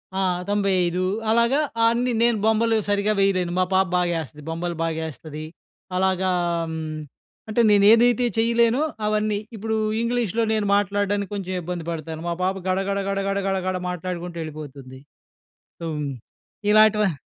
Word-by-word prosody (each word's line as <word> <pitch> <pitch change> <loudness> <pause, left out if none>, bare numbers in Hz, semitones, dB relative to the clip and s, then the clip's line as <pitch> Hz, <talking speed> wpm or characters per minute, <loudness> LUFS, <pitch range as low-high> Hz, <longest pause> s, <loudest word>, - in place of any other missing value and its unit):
ఆ! - - 0 0.3
95 185 -3 +1 0.3
అలాగా 235 +5 +3 0.3
అన్ని 240 +2 +1
నేను 235 -2 +3
బొమ్మలు 225 +1 +3
సరిగ్గా 205 +1 +2
వేయలేను. 185 -3 +2
మా 185 - +3
పాప 190 0 +3
బాగా 175 -1 +1
ఎస్తది, 150 +1 -13
బొమ్మలు 170 +1 -3
బాగా 160 -1 -2
ఎస్తది. 155 +1 -8 0.5
అలాగా 190 0 +1 1.2
అంటే 235 +2 +2
నేను 200 -1 +5
ఏదైతే 240 +1 +4
చేయలేనో 235 +3 +3 0.2
అవన్నీ 210 -1 +1 0.2
ఇప్పుడు 220 +1 -2 0.3
ఇంగ్లీష్‌లో 235 -2 0
నేను 215 -1 0
మాట్లాడడానికి 205 0 0
కొంచెం 185 -2 -4
ఇబ్బంది 175 -1 -5
పడతాను. 160 0 -5
మా - - 0
పాప 190 +1 +1
గడ, 185 0 +1
గడ, 200 0 0
గడ, 195 0 -1
గడ, 195 0 0
గడ, 195 - +1
గడ 185 - 0
మాట్లాడుకుంటూ 175 -1 -5
ఎళ్ళిపోతుంది. 140 -4 -9 0.8
సో, 165 - -4 0.9
ఇలాంటివ 210 - +4
195 Hz, 140 wpm, -23 LUFS, 175-215 Hz, 1.2 s, నేను